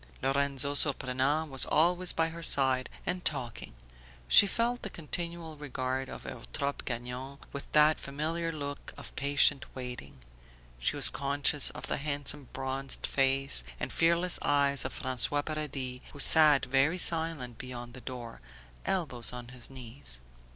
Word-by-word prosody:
Lorenzo 140 +1 +2
Surprenant 140 +2 +1
was 135 -1 +2
always 175 +3 +3
by 165 0 0
her 170 +1 -9
side 130 -4 +4 0.2
and 180 0 -3
talking; 125 - -4 0.5
she 205 - +7
felt 240 +4 -1
the 200 - -5
continual 170 -1 -6
regard 130 -2 -4
of - - -9
Eutrope 140 -1 -5
Gagnon 125 +3 -5 0.2
with 140 - -8
that 150 +1 +5
familiar 160 +4 -3
look 145 -2 -7
of - - -10
patient 140 0 +3
waiting; 125 - -8 0.6
she - - -1
was - - +9
conscious 140 +1 +1
of - - -8
the - - -2
handsome 145 -1 +1
bronzed 135 +1 -2
face 135 - +1 0.2
and - - -4
fearless 170 +2 +2
eyes 140 -1 +2
of - - -4
François 130 +3 -1
Paradis 140 -5 -4
who 145 - -12
sat 150 -1 +7
very 135 +6 +2
silent 160 -9 +1
beyond 120 -2 -8
the 125 - -11
door, 120 -3 -8 0.5
elbows 135 - -1
on 125 -1 -9
his 125 -1 -7
knees. 125 - -7
140 Hz, 145 wpm, -30 LUFS, 130-155 Hz, 0.6 s, was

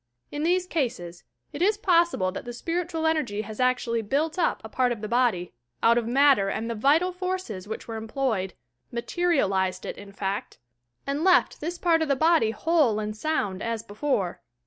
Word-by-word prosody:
In 295 - -4
these 360 +3 +2
cases, 205 - -3 0.3
it 295 - -5
is 415 +3 +3
possible 340 - +2
that 195 - -6
the 240 - -7
spiritual 330 +4 -2
energy 275 -10 0
has 215 0 -9
actually 250 -2 +1
built 300 - -1
up 340 - +1
a - - -6
part 250 +2 +1
of 230 -3 -4
the 215 - -3
body, 230 -7 +1 0.3
out 230 +1 +6
of 235 -1 0
matter 265 -5 +4
and 220 +3 -3
the 235 - -2
vital 290 +11 +3
forces 365 - -4
which 220 - -6
were 225 -1 -5
em 220 0 -6
ployed, 220 -7 -1 0.2
— - - -49
"materialized" 200 - 0
it, - - -6
in 200 0 -11
fact 200 0 -4 0.2
— 120 0 -50
and 280 +3 -2
left 365 -1 +3
this 340 +3 -3
part 335 -2 +2
of 320 - +1
the 280 - +2
body 315 -5 +3
whole 280 -1 +2
and 210 0 -3
sound, 210 -8 -1
as 230 -1 -3
before. 205 -4 -2
245 Hz, 195 wpm, -26 LUFS, 210-325 Hz, 0.3 s, out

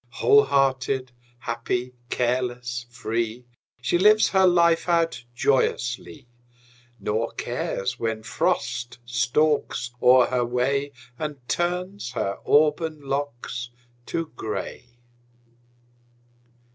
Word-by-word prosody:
Whole 425 0 +4
hearted, 130 -1 +1 0.3
happy, 120 +1 -3 0.2
careless, 120 -1 -1
free, 115 0 -3 0.4
She 175 +8 +2
lives 215 +3 +6
her 190 -1 +4
life 170 -1 +3
out 165 -6 +1
joyously, 125 0 0 0.7
Nor 110 +3 -1
cares 120 +5 -3
when 110 -1 -2
Frost 115 +1 -1
stalks 125 +1 +1
o'er 125 0 +7
her 125 -1 0
way 135 +4 0 0.3
And 145 -5 -5
turns 180 -4 -2
her 100 -5 -2
auburn 155 +1 +3
locks 135 -3 -4 0.4
to 165 -1 -3
gray. 120 +2 -6
125 Hz, 95 wpm, -24 LUFS, 120-155 Hz, 0.7 s, o'er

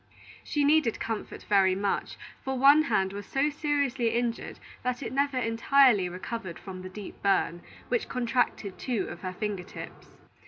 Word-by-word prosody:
She 295 - 0
needed 285 -5 +3
comfort 225 -2 -4
very 190 -2 +4
much; 200 +1 -2 0.3
for 265 0 -2
one 280 +4 +7
hand 195 -6 +1
was 205 0 -7
so 280 +2 +1
seriously 285 -5 0
injured 235 -1 -2 0.2
that 250 +1 -2
it 245 - -5
never 280 0 +1
entirely 230 -3 +4
recovered 185 0 -6
from 185 -2 -8
the 185 - -7
deep 200 +1 -9
burn, 195 -3 +1 0.3
which 480 - -1
contracted 240 -5 -1
two 235 -7 -1
of - - -8
her 185 -1 -4
finger 205 -1 -3
tips. 180 - -11
230 Hz, 160 wpm, -28 LUFS, 195-270 Hz, 0.3 s, one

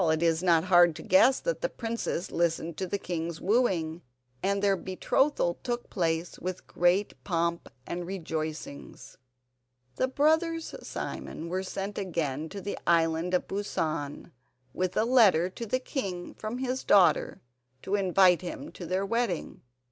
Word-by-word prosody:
It 160 +1 +1
is 165 0 +2
not 170 -3 +4
hard 175 -3 +5
to - - -8
guess 255 +8 +5
that - - -2
the - - 0
princess 225 -6 -3
listened 170 -1 0
to 190 - -2
the 200 - -1
king's 170 -3 -4
wooing, 180 -7 +1 0.4
and 200 +1 +1
their 200 -1 +4
betrothal 185 +1 0
took 240 -1 -4
place 165 -2 -1
with 185 0 -5
great 180 +4 +1
pomp 170 -2 -1 0.2
and 175 0 -4
rejoicings. 160 -5 -6 0.8
The 260 - +2
brothers 320 +4 +1
Simon 165 - -6
were 185 +2 -1
sent 195 +2 -4
again 160 -5 -2
to 200 +2 -7
the 200 +2 -4
Island 165 +1 +2
of 180 - -1
Busan 160 -7 -3 0.4
with 185 -1 -2
a 220 - +3
letter 200 -8 +5
to 230 +4 -6
the 255 - +1
king 195 -9 -4
from 220 +3 -5
his 260 0 -2
daughter 195 -3 +4 0.4
to 195 - -4
invite 185 -2 +4
him 180 - -6
to 175 - -8
their 185 +3 0
wedding. 230 -4 -2
185 Hz, 150 wpm, -28 LUFS, 170-205 Hz, 0.8 s, hard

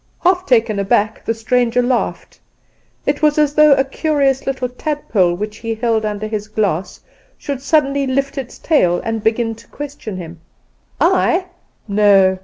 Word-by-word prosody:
Half 365 0 +2
taken 225 -5 +2
aback 205 +2 0
the 225 - -1
stranger 245 +2 +1
laughed. 245 0 -2 0.7
It 285 +1 0
was 300 -1 +3
as 300 -1 +2
though 305 -1 +6
a 270 - +3
curious 275 -1 0
little 260 -2 -1
tadpole 245 - -1
which 210 +3 -5
he 225 0 -4
held 225 -1 0
under 210 0 -3
his 215 -1 -4
glass 200 -5 -2 0.4
should 280 -3 -5
suddenly 280 -1 +1
lift 275 +1 -1
its 265 -3 -6
tail 180 - +2
and 225 -1 -2
begin 225 +1 +1
to 230 +1 -16
question 280 -9 -7
him. 165 -2 -9 0.6
"I? 365 +2 +2 0.4
no." 200 -2 +4
235 Hz, 155 wpm, -18 LUFS, 210-280 Hz, 0.7 s, though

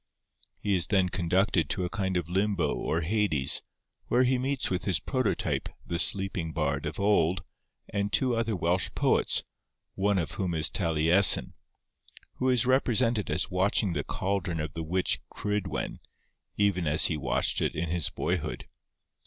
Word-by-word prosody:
He 100 -1 0
is 90 - 0
then 95 -3 +2
conducted 90 0 +1
to 90 - -1
a - - -3
kind 95 -2 -1
of 85 -3 -3
limbo 95 -4 0
or 80 - -2
Hades, 85 -7 0 0.5
where 125 +2 +3
he 130 0 +2
meets 135 -2 -1
with 90 -1 -2
his 90 -4 +1
prototype 130 +3 -1 0.2
the 85 -1 -1
Sleeping 95 -4 +1
Bard 70 +1 -1
of 75 - -6
old 95 -3 +2 0.4
and 100 0 -2
two 125 +1 +2
other 115 -1 -1
Welsh 90 +1 0
poets, - - +1 0.5
one 100 +1 +1
of 85 -4 -2
whom 90 -3 -2
is 80 0 0
Taliesin, 85 +2 +5 0.8
who 130 - 0
is 125 -1 +2
represented 120 -4 +1
as - - -1
watching 95 +1 +1
the - - -2
caldron 95 -4 -2
of 75 +1 -4
the 80 - -5
witch 80 -6 0
Cridwen, 105 -2 -3 0.6
even 100 -5 +1
as 75 +1 +4
he 80 - +1
watched 65 -5 0
it - - -1
in 80 +1 -2
his 85 -2 -1
boyhood. 90 -2 -3
95 Hz, 160 wpm, -28 LUFS, 85-105 Hz, 0.8 s, Taliesin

